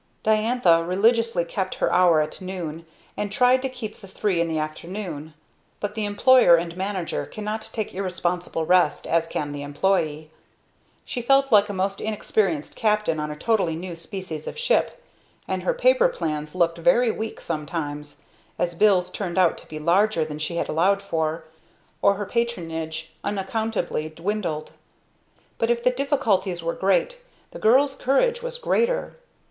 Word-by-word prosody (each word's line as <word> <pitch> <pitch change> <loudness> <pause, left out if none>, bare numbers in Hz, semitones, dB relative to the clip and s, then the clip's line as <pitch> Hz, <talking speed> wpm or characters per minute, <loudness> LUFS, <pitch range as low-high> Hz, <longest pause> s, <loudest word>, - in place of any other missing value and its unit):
Diantha 215 -6 +3
religiously 215 +1 +2
kept 185 +2 -3
her - - 0
hour 175 -4 +5
at 150 +4 -4
noon, 170 -3 -6 0.3
and 205 -1 -3
tried 250 +4 +4
to 265 - -2
keep 230 -4 -8
the 195 - -11
three 190 -2 0
in 170 - +1
the 160 -1 -2
afternoon; 155 0 -5 0.4
but 205 0 -3
the 215 -1 -2
employer 205 -1 +6
and 170 0 -2
manager 190 -2 -3
cannot 215 +1 -5
take 215 -3 -4
irresponsible 180 -3 -2
rest 180 +2 +3
as 165 0 +1
can 150 -3 -3
the 145 0 -5
employee. 155 0 -1 0.7
She 245 - -4
felt 275 +2 +3
like 210 -1 +5
a - - -3
most 195 +1 -2
inexperienced 205 -7 -1
captain 210 -7 +1
on 150 0 -3
a 150 - -5
totally 190 -2 +1
new 175 +1 -6
species 165 -3 -7
of - - -6
ship, 485 +1 0 0.4
and - - -2
her - - +1
paper - - +4
plans 155 - -4
looked 170 -2 +1
very 245 +4 +4
weak 220 0 -5
sometimes, 150 -2 -5 0.3
as 175 -1 -1
bills 180 -1 +3
turned 185 -3 -4
out 180 -3 +4
to - - -13
be 155 - -6
larger 170 +2 +2
than 150 -1 -7
she 155 +3 -3
had - - -1
allowed 195 +5 +2
for, 160 -3 -2 0.6
or 200 0 +4
her 205 +1 -4
patronage 165 -9 -3
unaccountably 205 -4 -2
dwindled. 170 -1 -3 0.9
But 230 - +1
if 240 0 +1
the 250 - +4
difficulties 225 - 0
were 165 0 -1
great, 195 - +1 0.3
the - - -9
girl's 270 +5 +4
courage 475 - +1
was - - -4
greater. 485 0 0
190 Hz, 160 wpm, -24 LUFS, 165-220 Hz, 0.9 s, employer